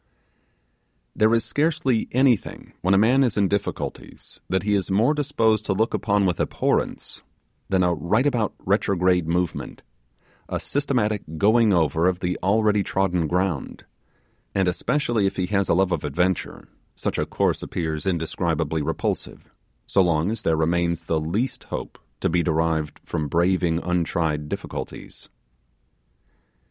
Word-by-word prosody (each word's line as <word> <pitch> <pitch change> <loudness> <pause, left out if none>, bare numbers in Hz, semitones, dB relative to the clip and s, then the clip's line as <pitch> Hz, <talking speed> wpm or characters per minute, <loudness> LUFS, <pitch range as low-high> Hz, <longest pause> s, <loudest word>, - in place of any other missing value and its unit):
There 110 +1 +3
is 115 -1 +2
scarcely 145 -3 0
anything 130 -3 +1
when 95 +2 +3
a - - +5
man 125 +7 +4
is 120 -5 0
in 100 -1 +3
difficulties 100 +1 -4
that 95 +1 0
he 105 0 +1
is 100 -3 0
more 110 +9 +3
disposed 115 -8 +1
to 95 - +2
look 110 +4 0
upon 100 -1 +1
with 90 -3 0
abhorrence - - -1 0.5
than 95 -1 +2
a 90 -1 +2
rightabout 110 - +1
retrograde 90 -3 +2
movement 90 +1 -2 0.7
a - - -2
systematic 120 -8 0 0.2
going 110 +4 +4
over 80 -1 +2
of 90 -1 0
the 90 0 -1
already 105 +2 +2
trodden 90 -4 0
ground: 90 -3 -2 0.7
and 95 -2 +2
especially 115 - 0
if - - -3
he 90 - 0
has 100 0 0
a - - +4
love 95 0 +2
of 85 -4 -1
adventure, 90 +5 -1 0.3
such - - -2
a - - +1
course - - 0
appears 80 -1 -3
indescribably 80 -2 -1
repulsive, - - -3 0.3
so 100 - +3
long 85 +1 +2
as 115 -1 -4
there 80 -5 +1
remains 85 +1 0
the 80 -1 0
least 100 +12 -2
hope - - -6 0.2
to - - +2
be 85 +1 +2
derived 80 -2 0
from 80 -3 -2
braving 85 +1 +1
untried 80 -4 -1
difficulties. - - -7
95 Hz, 145 wpm, -23 LUFS, 85-110 Hz, 0.7 s, a